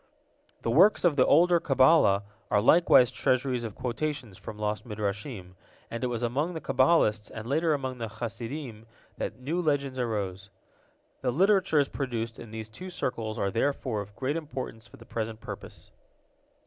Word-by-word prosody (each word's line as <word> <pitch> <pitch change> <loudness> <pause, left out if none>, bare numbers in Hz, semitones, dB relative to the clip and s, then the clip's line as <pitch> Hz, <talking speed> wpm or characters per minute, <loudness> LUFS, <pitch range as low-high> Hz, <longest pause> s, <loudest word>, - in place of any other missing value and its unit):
The 115 - 0
works 185 - +5
of 165 -4 +4
the 130 - +4
older 175 +3 +5
Kabbalah 130 -8 +4 0.3
are 105 - +3
likewise 125 0 +6
treasuries 130 -1 0
of 110 -3 -6
quotations 125 -2 -3
from 105 - -9
lost 105 0 -2
Midrashim, 105 -2 -4 0.4
and 115 +2 -4
it - - +2
was 120 -1 -3
among 145 +9 -1
the - - -3
Kabbalists, 130 -7 +2
and 110 -1 -8
later 155 +3 +2
among 130 -3 -4
the 115 - -3
Hasidim, 115 +1 -6 0.3
that - - -4
new 155 +8 -2
legends 140 -5 0
arose. 100 -5 -3 0.7
The 130 - 0
literatures 180 -1 +3
produced 115 -5 -4
in 115 - -9
these 110 0 -6
two 180 +13 -9
circles 115 -10 -3
are 100 - 0
therefore 120 -2 -1
of 100 0 -11
great 140 +4 -1
importance 130 -8 -6
for - - -16
the 115 - -14
present 110 -2 -4
purpose. 115 - -9
125 Hz, 160 wpm, -28 LUFS, 110-145 Hz, 0.7 s, likewise